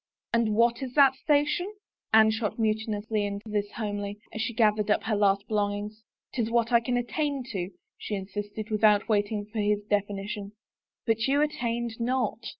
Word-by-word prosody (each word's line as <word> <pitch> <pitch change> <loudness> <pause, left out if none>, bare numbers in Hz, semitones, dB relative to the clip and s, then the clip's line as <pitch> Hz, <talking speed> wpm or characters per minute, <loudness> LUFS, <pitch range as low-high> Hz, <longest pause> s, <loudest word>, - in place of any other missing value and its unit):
"And 230 -2 +2
what 235 +2 +3
is 255 -2 -5
that 275 -3 +7
station?" 300 +7 +1 0.4
Anne 220 0 +6
shot 220 -1 -2
mutinously 215 -1 -1
into 205 +1 -4
this 205 -1 -1
homily, 205 -2 -4 0.2
as 220 - -3
she 230 - -1
gathered 215 -2 +2
up 210 - +2
her 220 -1 0
last 200 0 +2
belongings. 210 0 -2 0.2
" - - -53
'Tis 230 -3 -1
what 235 0 +1
I 235 - +6
can 245 +1 -1
attain 280 +2 -1
to," 185 -4 -3 0.3
she 210 - -3
insisted, 205 +2 -5
without 210 -1 +4
wait 205 -2 +1
ing 205 -2 -2
for 215 +1 -6
his 210 0 +1
definition. 205 0 -2 0.3
" - - -66
But 225 +1 +1
you 285 +2 +3
attained 235 -5 -2
not." 235 -2 -1
220 Hz, 180 wpm, -27 LUFS, 205-235 Hz, 0.4 s, that